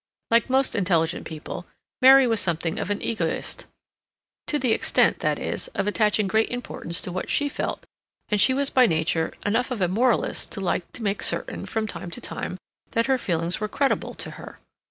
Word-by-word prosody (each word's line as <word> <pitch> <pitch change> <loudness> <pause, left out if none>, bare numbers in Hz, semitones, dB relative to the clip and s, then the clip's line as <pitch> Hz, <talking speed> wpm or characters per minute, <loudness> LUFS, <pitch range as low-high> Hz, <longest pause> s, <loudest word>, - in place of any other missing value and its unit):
Like 230 +3 +3
most 265 +1 +3
intelligent 175 -5 +1
people, 160 +2 -7 0.3
Mary 265 +1 +8
was 225 -3 +2
something 165 -3 0
of - - -3
an 205 - -2
egoist, 230 -1 -2 0.8
to 300 - +1
the 255 -5 +1
extent, - - +2
that - - 0
is, - - -3
of - - 0
attaching 210 0 +2
great 220 +3 +2
importance 215 -8 -4
to 180 - -4
what 185 +1 -4
she 290 - +2
felt, - - -4 0.4
and 210 -2 +1
she - - +6
was 280 0 +1
by 255 -2 +5
nature 160 -1 0
enough 225 +6 +1
of 250 -4 -3
a 180 - +2
moralist 230 +6 +1
to - - -4
like 180 -2 -2
to 235 - -6
make 200 -1 -1
certain, - - -2
from 220 -1 -1
time 195 -4 -5
to 170 - -5
time, 180 - -4 0.4
that 230 0 +2
her 265 -1 +2
feelings 170 -4 -1
were 215 - -1
creditable 275 +5 -1
to - - -4
her. - - -11
210 Hz, 195 wpm, -24 LUFS, 180-250 Hz, 0.8 s, Mary